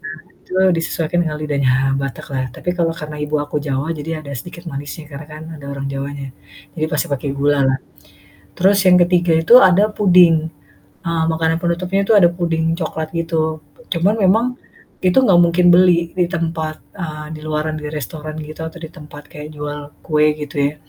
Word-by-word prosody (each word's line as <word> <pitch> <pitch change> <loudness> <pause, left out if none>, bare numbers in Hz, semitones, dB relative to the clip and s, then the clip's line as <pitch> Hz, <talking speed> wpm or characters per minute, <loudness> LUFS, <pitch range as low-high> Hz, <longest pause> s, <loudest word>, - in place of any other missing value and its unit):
Nah 170 -2 -7 0.3
itu - - -10 0.2
disesuaikan 165 0 -1
dengan 155 -3 -3
lidahnya 140 -4 +1 0.2
Batak 135 -1 -4
lah. 130 -1 0
Tapi 180 - -4
kalau 170 -2 +1
karena 150 -1 -7
ibu 150 +1 -1
aku 145 0 -4
Jawa 145 +3 -2
jadi 155 +2 -4
ada 140 -1 -8
sedikit 170 +6 -9
manisnya 145 +3 -7
karena 145 +1 -8
kan 155 +1 -9
ada 145 -2 -11
orang 140 0 -5
Jawanya. 140 0 -5 0.5
Jadi 155 - -1
pasti 150 +2 0
pakai 140 -2 -3
gula 145 +1 +2
lah. 135 0 +2 0.8
Terus 195 +2 +4
yang 180 -1 +7
ke-3 175 -1 +2
itu 165 +8 +5
ada 190 +3 +5
puding, 180 -4 +6 0.7
eee, 165 -1 0
makanan 160 0 +1
penutupnya 180 +3 0
itu 225 - +5
ada 180 -4 +7
puding 165 -2 0
coklat 160 -1 -3
gitu. 160 -2 -1 0.3
Cuman 185 +4 +2
memang 210 +5 +4 0.6
itu 180 +4 +4
nggak 195 -9 +5
mungkin 175 +1 +3
beli 175 -1 +4
di 180 - +3
tempat, 165 -3 -2 0.2
eee, 155 -4 -6
di - - -10
luaran 155 0 -2
di 155 - -7
restoran 155 +1 -6
gitu 155 +1 -7
atau 160 +1 -7
di 160 - -7
tempat 150 -3 -13
kayak 150 0 -9
jual 145 0 -5 0.2
kue 150 -1 +2
gitu 150 -1 -7 0.2
ya. - - -16
160 Hz, 180 wpm, -18 LUFS, 150-175 Hz, 0.8 s, yang